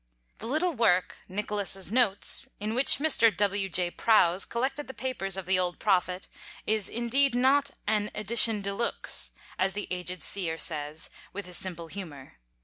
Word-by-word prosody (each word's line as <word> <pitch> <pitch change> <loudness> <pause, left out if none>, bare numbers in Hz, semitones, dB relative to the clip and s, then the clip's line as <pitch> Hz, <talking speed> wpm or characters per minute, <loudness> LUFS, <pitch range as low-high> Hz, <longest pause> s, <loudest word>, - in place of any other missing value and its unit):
The 225 - -7
little 320 +7 0
work, 185 - +1
"Nicholas's 200 -1 -1
Notes," 235 +1 +4
in 210 +2 -3
which 255 +3 +3
Mr. 275 -6 +4
W. 200 -1 0
J. 180 -1 0
Prowse 190 -5 +3
collected 270 +5 -3
the 265 - -9
papers 195 -8 -2
of 190 - -5
the 185 0 +1
old 180 -1 -2
Prophet, 185 -2 -1 0.4
is, 215 -2 -1
indeed, 240 +3 +1
not 270 +3 +2 0.2
an 210 0 0
"edition 215 0 +4
de 200 0 -3
looks," 235 +4 0 0.3
as 190 +1 +1
the 205 - -5
aged 180 -2 -4
Seer 170 -5 -3
says, 150 -1 -2 0.2
with 200 +1 -6
his 180 -1 -3
simple 170 -3 -4
humour. 155 - -10
200 Hz, 160 wpm, -27 LUFS, 180-235 Hz, 0.4 s, Notes